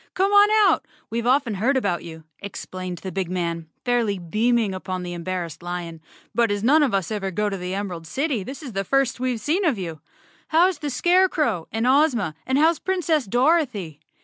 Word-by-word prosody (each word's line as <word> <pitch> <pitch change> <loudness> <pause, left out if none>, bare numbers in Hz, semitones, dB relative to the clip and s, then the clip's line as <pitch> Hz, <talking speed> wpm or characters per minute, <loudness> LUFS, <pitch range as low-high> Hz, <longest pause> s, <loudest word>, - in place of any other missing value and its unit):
Come 390 +2 +2
on 410 0 +7 0.2
out. - - +2 0.3
We've 235 +1 -2
often 255 -3 +2
heard 240 +8 +1
about 200 -8 -1
you," 160 -1 -10 0.2
explained 185 -2 -6
the 190 - -4
big 190 -2 -2
man, 170 -3 -3 0.2
fairly 235 -5 +1
beaming 215 +4 +1
upon 185 -1 -4
the 175 0 -5
em¬ 170 -1 -6
barrassed 175 -3 -4
lion, 175 -2 -5 0.3
"but 235 -1 +2
as 205 0 -1
none 295 +7 +5
of 280 -5 +2
us 195 -1 -1
ever 200 -3 -2
go 210 +3 -1
to 200 - -3
the 180 0 -4
Em¬ 200 +1 -2
erald 165 -3 -7
City 275 - -1
this 265 +10 -8
is 255 -6 -7
the 195 0 -1
first 270 +3 +1
we've 250 -2 -1
seen 320 - 0
of 300 - +2
you. 165 -5 -6 0.5
How 330 +3 +5
is 355 -6 -5
the 295 - -3
Scarecrow 345 - +2
and 225 +1 -1
Ozma, 255 - +3
and 260 +1 +2
how's 320 +2 +3
Princess 335 -7 0
Dorothy? 245 - +1
220 Hz, 205 wpm, -23 LUFS, 180-280 Hz, 0.5 s, on